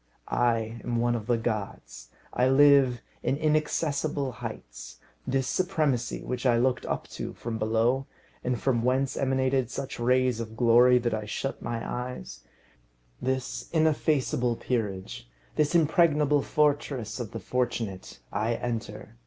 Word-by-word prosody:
I 115 -1 +1
am 120 - -2
one 120 +1 +2
of 115 -2 -4
the 120 -1 +2
gods. 100 - -4 0.2
I 125 +1 +3
live 135 -3 +5 0.2
in 135 - 0
inaccessible 150 -2 0
heights. - - -8 0.3
This 135 0 +1
supremacy, 155 -8 0
which 125 -1 -4
I 120 -3 +4
looked 125 +1 +1
up - - -3
to - - -6
from 115 -1 -5
below, 115 +5 +1 0.4
and 125 -1 -1
from 125 -4 +1
whence 130 +2 +1
emanated 130 -2 +1
such 135 -1 -5
rays 125 0 +2
of 110 -1 -6
glory 120 +1 +6
that 120 -2 0
I 110 -1 -2
shut 135 +6 -4
my 115 -1 -4
eyes; 125 - -5 0.8
this 130 -1 -2
ineffaceable 150 -6 +1
peerage; 100 - -3 0.3
this 150 +3 +1
impregnable 150 -3 +4
fortress 140 -7 0
of 120 -4 -4
the 115 - -6
fortunate, 115 - -3
I 110 +3 0
enter. 115 -2 -5
125 Hz, 135 wpm, -27 LUFS, 115-135 Hz, 0.8 s, glory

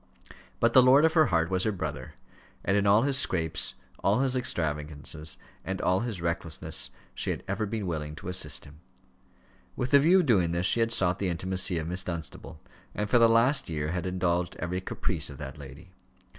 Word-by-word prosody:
But 115 0 +2
the 130 - +8
lord 135 +5 +6
of 160 - +2
her 155 -4 +4
heart 85 -3 0
was 95 0 +1
her 110 - +1
brother; 75 -8 -6 0.5
and 95 - +1
in 100 0 +2
all 105 +3 +5
his 140 -1 +3
scrapes, 80 - 0 0.3
all 105 +6 +2
his 135 -1 0
extravagances, 75 - -2 0.3
and 95 0 -4
all 90 +1 +1
his 110 -7 -4
recklessness, 85 -1 -2 0.2
she - - -2
had - - -3
ever 105 +2 -2
been 105 -1 -4
willing 75 -3 -4
to 80 - -10
assist 90 -5 -1
him. 75 +2 -15 1.0
With 125 - -3
the 140 - +7
view 175 +6 +5
of - - -3
doing 90 - +2
this 85 +1 0
she 115 - +5
had 115 0 +1
sought 95 -6 +2
the 95 - -1
intimacy 95 +2 +1
of 80 -1 -3
Miss 90 +2 0
Dunstable, 85 -6 -7 0.4
and 105 -1 -3
for 120 - +5
the 115 -1 +6
last 115 - +3
year 75 -2 -3
past - - -3
had 90 -1 -3
indulged 90 -1 -1
every 90 +2 -3
caprice 95 - -2
of 70 - -10
that 70 +1 -8
lady. 70 +7 -12
90 Hz, 205 wpm, -27 LUFS, 80-115 Hz, 1.0 s, the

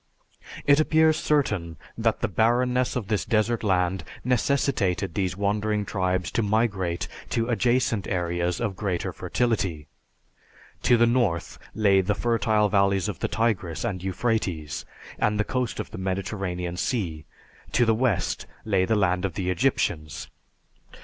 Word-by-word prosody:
It 140 +1 +5
appears 160 0 +4
certain 100 - 0 0.2
that 115 -1 0
the 120 - +1
barrenness 125 +5 +2
of 120 -6 -3
this 105 -1 0
desert 115 0 +1
land 90 -2 +1 0.2
necessitated 120 - +1
these 95 -1 -1
wandering 105 +1 0
tribes 95 -2 -1
to - - +1
migrate 100 -5 0 0.2
to 115 +1 0
adjacent 120 -3 +1
areas 85 -1 -1
of 105 -5 -2
greater 95 -3 -2
fertility. 95 -11 -1 1.0
To 120 - +4
the 120 - +5
north 115 -9 0 0.2
lay 100 -3 +4
the 100 +2 0
fertile 110 -2 +2
valleys 100 -1 +2
of 105 -6 -4
the - - 0
Tigris 100 -6 -1
and 95 -6 -2
Euphrates 95 -6 -2 0.3
and 105 0 +1
the - - +3
coast 125 0 -2
of - - -5
the - - -7
Mediterranean 95 -2 -3
Sea; 85 - -2 0.5
to 120 - +3
the 115 - +4
west 115 -4 0 0.2
lay 95 -4 +2
the 110 - +1
land 90 -3 +1
of 95 -4 -2
the 90 -1 -1
Egyptians. 85 - -1
105 Hz, 145 wpm, -25 LUFS, 90-115 Hz, 1.0 s, It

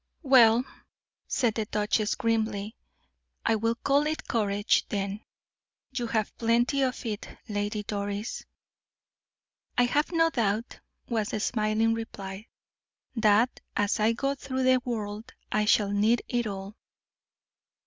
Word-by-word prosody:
"Well," 245 -4 +6 0.6
said 240 -4 +1
the 220 0 -2
duchess, 210 0 0
grimly, 220 -1 -1 0.7
"I 225 - +3
will 230 +2 0
call 280 +4 +2
it 310 +1 -3
courage, 205 -2 +1
then; 200 +1 -3 0.7
you 245 -2 -2
have 220 -2 -1
plenty 240 +4 +2
of 255 -2 -1
it, 210 -2 -4 0.2
Lady 210 0 -2
Doris." 205 +2 -4 1.3
"I 245 - +6
have 290 +7 +1
no 330 -1 +3
doubt," 220 -2 -1 0.3
was 220 -3 -1
the 215 - -2
smiling 220 +1 +1
reply, 205 -2 -6 0.7
"that 225 +2 +3 0.2
as 205 +1 +1
I 220 +2 +3
go 275 +4 -1
through 260 -1 -3
the 255 0 +4
world 220 0 -4 0.2
I 210 0 +2
shall 210 -1 +3
need 215 +4 +2
it 240 -2 0
all." 195 0 -6
225 Hz, 130 wpm, -28 LUFS, 210-245 Hz, 1.3 s, Well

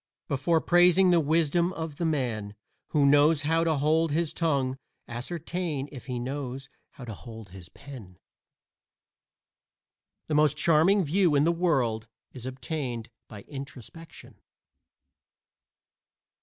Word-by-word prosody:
Before 150 +5 +1
praising 180 +2 +4
the 175 - +5
wisdom 165 +3 +1
of 160 -3 -6
the 170 - -2
man 120 -9 -2 0.3
who 145 -3 +2
knows 145 +2 +4
how 165 +2 +2
to 160 -1 +1
hold 155 +3 +2
his 160 +1 -1
tongue 140 -6 0 0.3
ascertain 150 +3 -4
if 135 -4 -10
he 125 -2 -3
knows 135 +1 -5 0.2
how 125 - -10
to 115 - -6
hold 110 -2 -11
his 90 -3 -12
pen. 110 - -12 2.1
The 155 - -4
most 150 -1 +3
charming 170 +6 +4
view 170 0 +2
in 140 - +4
the 165 - +3
world 130 -11 0 0.3
is 130 -1 -8
obtained 130 -3 -5 0.2
by 105 -3 -10
introspection. 140 +3 -11
145 Hz, 125 wpm, -27 LUFS, 130-165 Hz, 2.1 s, the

